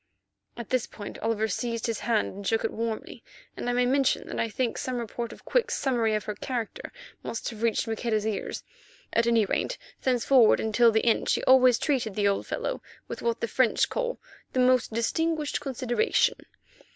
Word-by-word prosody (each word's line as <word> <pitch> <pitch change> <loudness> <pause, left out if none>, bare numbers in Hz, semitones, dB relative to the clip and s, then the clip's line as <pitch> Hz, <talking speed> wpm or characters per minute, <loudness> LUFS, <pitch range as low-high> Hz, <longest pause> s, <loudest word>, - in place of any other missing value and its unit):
At 235 -3 -8
this 255 -2 +1
point 205 -2 -9
Oliver 220 -1 0
seized 230 +2 -2
his 230 -2 -2
hand 220 0 0
and 200 0 -7
shook 225 0 +1
it - - -1
warmly, 225 -1 -4 0.3
and - - -3
I - - +1
may 245 0 +2
mention 270 +1 +1
that - - -4
I 230 - 0
think 240 +2 -1
some 255 -1 -3
report 235 0 -4
of - - -13
Quick's - - +1
summary 235 -5 +1
of 215 - -2
her 210 - -4
character 250 - -5 0.3
must 230 - -5
have 220 -1 -10
reached 230 0 +1
Maqueda's 220 -1 -1
ears. 215 -2 -3 0.5
At 230 0 +2
any 230 -2 +4
rate, - - -1 0.2
thenceforward 250 -2 +4
until 225 +2 +4
the 220 +1 +1
end 230 - +2
she - - +1
always 255 -2 +6
treated 250 -9 -1
the 205 -1 +2
old 200 - 0
fellow - - -3 0.3
with - - -6
what 235 -1 -1
the 230 - 0
French 250 0 +2
call - - -2 0.3
the 255 - 0
"most 255 -2 +3
distinguished 305 +7 -1
consideration." 260 - +1
235 Hz, 190 wpm, -27 LUFS, 220-255 Hz, 0.5 s, always